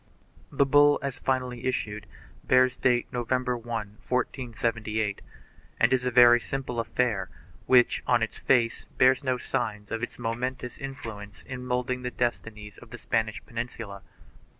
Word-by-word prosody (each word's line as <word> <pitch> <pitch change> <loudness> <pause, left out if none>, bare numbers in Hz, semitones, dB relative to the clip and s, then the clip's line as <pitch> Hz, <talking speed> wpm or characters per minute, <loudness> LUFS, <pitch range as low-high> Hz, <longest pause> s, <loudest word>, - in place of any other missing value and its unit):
The 140 - +3
bull 145 +1 +5
as 135 -3 -4
finally 125 -2 -2
issued 105 -5 -2 0.4
bears 130 0 +4
date 120 -1 +2
November 125 +1 0
1, 120 0 -10 0.3
1478, 115 -4 -2 0.6
and - - +4
is 125 -1 +1
a - - +3
very 120 -1 +7
simple 125 -1 -4
affair 110 -4 0 0.4
which, 125 -2 +5
on 120 -2 +3
its 110 - -4
face, 120 -3 +2
bears 130 +2 +4
no 130 -1 +1
signs 105 -3 -3
of 115 - -2
its 120 - -5
momentous 125 +2 -4
influence 110 -7 -8
in 130 -2 -7
moulding 125 0 -1
the 125 - -3
destinies 115 -4 -4
of - - -15
the - - -8
Spanish 110 -1 -2
Peninsula. 115 -4 -6
120 Hz, 145 wpm, -27 LUFS, 115-130 Hz, 0.6 s, very